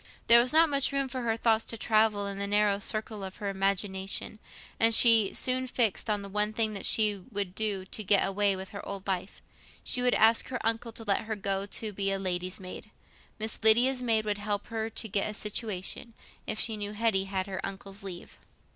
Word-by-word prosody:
There 235 0 +8
was 250 - 0
not 325 +2 +6
much 280 -2 +2
room 275 -1 -1
for 255 0 -5
her 225 -2 -1
thoughts 225 -1 +2
to 230 - -6
travel 215 -2 +2
in 200 0 -5
the 200 - -2
narrow 205 -1 +2
circle 215 0 -4
of 190 0 -7
her 205 -2 -4
imagination, 195 +1 -2 0.4
and 225 0 +5
she 225 -5 +6
soon 255 0 0
fixed 230 -3 0
on 210 -1 0
the 200 - -7
one 210 +2 -1
thing 220 -1 -1
she 210 -3 +3
would 200 -3 -1
do 200 -3 -2
to 215 +3 -5
get 200 0 +4
away 195 0 +1
from 190 0 -6
her 200 +1 -9
old 195 -1 -7
life: 190 0 -4 0.4
she 250 - +1
would 250 0 +2
ask 225 +1 +4
her 255 -2 -4
uncle 225 +1 0
to 225 - -5
let 205 0 0
her 220 0 -3
go 195 0 -2
to 215 +1 -3
be 195 0 -1
a 195 - 0
lady's 185 -1 -3
maid. 185 +3 -9 0.5
Miss 220 +1 -1
Lydia's 245 +4 +5
maid 225 -3 +1
would 205 -1 -2
help 205 0 -3
her 225 -1 -3
to 225 - -4
get 200 0 -1
a 210 - -6
situation, 210 +1 -4 0.3
if 215 - -2
she 220 -2 0
knew 205 0 -5
Hetty 210 -3 0
had 190 -1 -3
her 190 -1 -6
uncle's 195 0 -6
leave. 185 -3 -9
210 Hz, 215 wpm, -28 LUFS, 195-225 Hz, 0.5 s, There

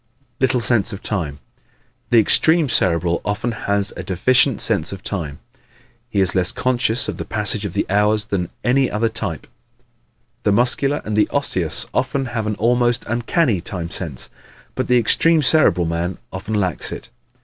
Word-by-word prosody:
Little 130 -2 +2
Sense 115 -3 +4
of 100 - -8
Time 85 -9 -1
¶ - - -19 0.7
The 120 - +4
extreme 160 +7 +3
Cerebral 85 -4 +1
often 105 +4 -2
has 100 -2 -1
a - - -5
deficient 125 - +2
sense 80 - -1
of 95 -2 -8
time. 80 -7 -4 0.7
He 100 -4 +1
is 95 -2 +1
less 90 -1 +1
conscious 120 -2 0
of - - -4
the - - -4
passage 105 -1 -1
of 95 - -4
the 100 - 0
hours 105 +2 +2
than 90 -4 -2
any 130 +2 +2
other 115 +2 0
type. 110 -8 -5 1.0
The - - +1
Muscular 125 +6 +1
and 105 - -2
the 105 - +2
Osseous 95 - -2
often 135 -1 -1
have 115 -2 -2
an 105 - -1
almost 120 +2 +1
uncanny 120 - 0
time 85 -1 -5
sense, 80 -9 -3 0.4
but 130 - -3
the 125 - +4
extreme 155 +7 +3
Cerebral 125 - +3
man 85 +2 -2 0.2
often 95 +3 -4
lacks 95 -5 -2
it. - - -8
105 Hz, 170 wpm, -20 LUFS, 95-125 Hz, 1.0 s, Sense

